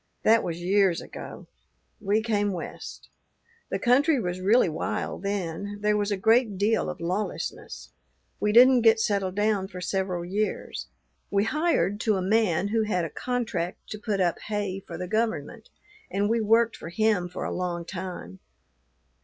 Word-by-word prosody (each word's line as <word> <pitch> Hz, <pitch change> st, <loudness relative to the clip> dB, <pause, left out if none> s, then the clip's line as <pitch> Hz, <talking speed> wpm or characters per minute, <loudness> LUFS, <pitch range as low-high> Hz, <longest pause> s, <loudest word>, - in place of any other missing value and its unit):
That 225 Hz, +1 st, +5 dB
was 170 Hz, -1 st, -4 dB
years 190 Hz, -2 st, +3 dB
ago. -, -, -9 dB, 0.5 s
We 210 Hz, +1 st, +1 dB
came 205 Hz, -3 st, 0 dB
West. 175 Hz, -, -8 dB, 0.6 s
The -, -, -1 dB
country 275 Hz, +4 st, +3 dB
was 180 Hz, -3 st, -3 dB
really 210 Hz, +3 st, +4 dB
wild 160 Hz, +1 st, -3 dB
then; 200 Hz, 0 st, -3 dB
there 210 Hz, 0 st, +2 dB
was 205 Hz, 0 st, 0 dB
a 200 Hz, -, 0 dB
great 220 Hz, +1 st, +3 dB
deal 215 Hz, +3 st, +1 dB
of 180 Hz, -, -6 dB
lawlessness. 185 Hz, +5 st, -4 dB, 0.5 s
We 210 Hz, -, +1 dB
didn't 250 Hz, +2 st, +7 dB
get 225 Hz, 0 st, +5 dB
settled 200 Hz, -3 st, 0 dB
down 205 Hz, -2 st, +1 dB
for 185 Hz, -2 st, -9 dB
several 185 Hz, -2 st, -2 dB
years; 205 Hz, +4 st, -3 dB, 0.4 s
we 200 Hz, 0 st, +2 dB
hired 300 Hz, -, +1 dB
to 220 Hz, -2 st, +1 dB
a -, -, -1 dB
man 200 Hz, -2 st, +2 dB
who 225 Hz, +1 st, +1 dB
had 185 Hz, -5 st, 0 dB
a 165 Hz, -, -6 dB
contract 220 Hz, -9 st, -3 dB
to 210 Hz, -, -5 dB
put 210 Hz, -2 st, -2 dB
up 175 Hz, -2 st, +1 dB
hay 205 Hz, -2 st, -2 dB
for 170 Hz, -3 st, -9 dB
the 180 Hz, +1 st, -5 dB
government, 220 Hz, -, -2 dB, 0.4 s
and 200 Hz, +1 st, 0 dB
we 230 Hz, +1 st, +1 dB
worked 225 Hz, +1 st, +3 dB
for 165 Hz, -, -8 dB
him 205 Hz, -2 st, +1 dB
for 175 Hz, -, -6 dB
a -, -, -3 dB
long 175 Hz, -2 st, -3 dB
time. 175 Hz, -, -7 dB
205 Hz, 165 wpm, -26 LUFS, 180-220 Hz, 0.6 s, didn't